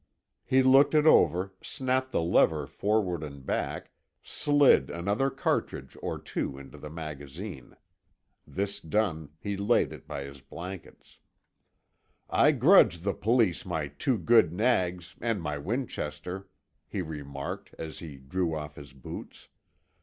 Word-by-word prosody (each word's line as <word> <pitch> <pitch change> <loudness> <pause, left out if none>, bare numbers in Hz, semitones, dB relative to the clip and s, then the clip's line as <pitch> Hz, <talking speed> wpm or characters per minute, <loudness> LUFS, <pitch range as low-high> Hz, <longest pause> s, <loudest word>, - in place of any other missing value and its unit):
He 130 0 +3
looked 135 +4 +6
it 150 0 +5
over, 95 - +4
snapped 130 -1 -1
the - - +1
lever 80 -3 +3
forward 90 +2 0
and 70 -3 -8
back, - - -3 0.3
slid 145 - +4
another 100 +10 0
cartridge 65 - -2
or - - -3
two 65 - -4
into 70 +2 -11
the 75 - -8
magazine. 75 - -8 0.7
This 100 +1 -2
done, 80 -4 -1
he 100 +2 -3
laid 100 +5 +2
it - - -12
by 70 - -5
his 70 0 -10
blankets. 90 +6 -10 1.1
"I - - +5
grudge 85 0 +5
the 100 +2 0
Police 110 -6 +2
my 80 -5 -3
two 110 - 0
good 110 -7 +4
nags, 90 -4 0
and 115 -3 0
my 75 -3 -3
Winchester," 95 - -4 0.4
he 95 - -3
remarked, 70 -4 -6
as 80 -1 -6
he 75 -5 -9
drew 80 +5 -2
off 75 -1 -6
his 70 -2 -11
boots. 65 -2 -10
90 Hz, 135 wpm, -29 LUFS, 75-110 Hz, 1.1 s, looked